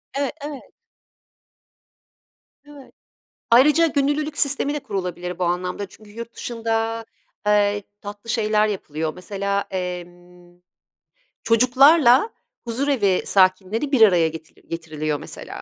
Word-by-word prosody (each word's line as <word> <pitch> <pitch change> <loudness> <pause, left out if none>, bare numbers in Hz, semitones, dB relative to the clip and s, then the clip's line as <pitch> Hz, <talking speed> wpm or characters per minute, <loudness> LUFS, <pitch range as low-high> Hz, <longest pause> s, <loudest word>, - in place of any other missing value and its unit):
E, 275 -2 -1
evet. 285 -2 -8 1.9
Evet. 290 -2 -15 0.6
Ayrıca 295 +8 +6
gönüllülük 290 0 -1
sistemi 280 0 +1
de 295 - -3
kurulabilir 180 -7 -5
bu 180 - 0
anlamda. 180 +3 -2
Çünkü 210 +2 -17
yurt 230 +2 -9
dışında, 225 -1 -2 0.4
eee, 205 0 +2 0.2
tatlı 205 +2 -8
şeyler 215 -2 +2
yapılıyor 160 -6 -3
mesela, 200 +1 -2
emm, 175 -1 -7 0.8
çocuklarla 255 - +5 0.4
huzurevi 235 -6 +1
sakinleri 195 +7 +2
bir 265 -5 +2
araya 180 -6 +6
getir 160 0 -10
getiriliyor, 155 -3 -3
mesela. - - -9
210 Hz, 105 wpm, -22 LUFS, 180-260 Hz, 1.9 s, Ayrıca